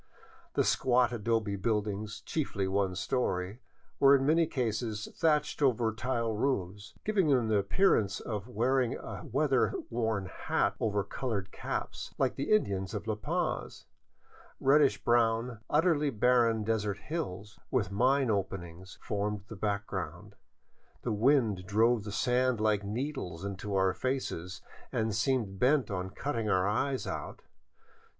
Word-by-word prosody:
The - - +3
squat 125 -2 +3
adobe 110 -2 0
buildings, 105 0 -2
chiefly 100 -11 -2
one 95 -1 0
story, 95 -2 -1 0.4
were 140 0 +7
in 135 -1 +1
many 160 +2 +4
cases 110 -3 -2
thatched 150 -2 +1
over 120 -5 +2
tile 115 0 -1
roofs, 100 -5 -2
giving 205 -5 +2
them 125 -6 +3
the 105 -2 +3
appearance 100 - +2
of 105 -2 -5
wearing 125 +1 +1
a 95 -5 -7
weather 135 0 +1 0.2
worn 110 -4 -1
hat 90 - -1
over 105 -2 0
colored 100 -2 -3
caps, - - -5
like 130 -2 +1
the 140 - -3
Indians 100 - +1
of 105 0 -4
La 110 - 0
Paz. 105 0 -3 0.7
Reddish 140 +1 +4
brown, 115 0 +2
utterly 150 -1 +3
barren 115 -2 +3
desert 105 -2 -1
hills, 105 - -5
with 110 -8 0
mine 130 +4 +3
openings, 95 -2 -4
formed 105 -2 -2
the 110 - -7
background. 100 -2 -3 0.7
The 120 - -1
wind 110 -5 +2
drove 110 +2 +3
the 105 - -5
sand 125 +2 +1
like 105 -1 +2
needles 105 - -4
into 100 +1 -4
our 95 -1 +3
faces 95 -9 -3 0.3
and 110 -1 0
seemed 110 -3 0
bent 130 -1 +3
on 95 -1 -3
cutting 115 +1 -3
our 95 -1 +2
eyes 130 +6 0
out. - - -6
110 Hz, 135 wpm, -31 LUFS, 100-130 Hz, 0.7 s, were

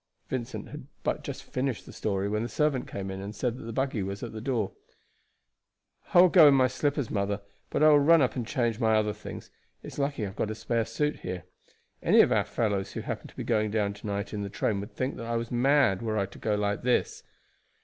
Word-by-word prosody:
Vincent 120 -3 -4
had - - -9 0.2
but - - -1
just - - -6
finished 130 -3 -3
his - - -12
story 100 -2 -1
when 105 +1 -1
the 120 - -3
servant 150 -4 0
came 95 -1 -5
in 95 0 -5
and 100 +2 -6
said 120 +3 -1
that - - -9
the 115 - -5
buggy 130 -2 -1
was 100 +1 -4
at 120 - -6
the 110 - -6
door. 115 -5 -1 1.4
"I 175 - +10
will 180 - +7
go 165 -3 +8
in 140 - +7
my 130 -1 +5
slippers, 140 0 -1
mother, 100 0 -1 0.3
but - - +1
I 155 - +8
will 150 -1 +7
run 165 +4 +6
up 125 - 0
and 120 -3 -3
change 120 -2 0
my 110 -2 +3
other 105 -1 +1
things. - - -9 0.3
It's - - -8
lucky 140 -4 -1
I 100 - -2
have 95 - -12
got 105 - -1
a 110 - -3
spare 115 +1 -1
suit 150 +7 -1
here. 90 -1 -5 0.6
Any - - +6
of - - +3
our - - +3
fellows 100 -4 -1
who - - -4
happened - - -5
to - - -20
be - - -3
going 110 0 +1
down 105 -1 0
to 105 +1 -9
night 100 +1 -3
in 105 - -3
the 100 - -4
train 100 +1 -1
would 100 +4 -8
think 130 +2 -2
that 115 - -6
I 115 - -1
was 115 0 -3
mad 125 -5 +3
were 110 -2 -1
I 100 - +1
to 100 - -13
go 105 -1 0
like 100 0 -1
this." 125 0 +1
115 Hz, 250 wpm, -28 LUFS, 100-130 Hz, 1.4 s, I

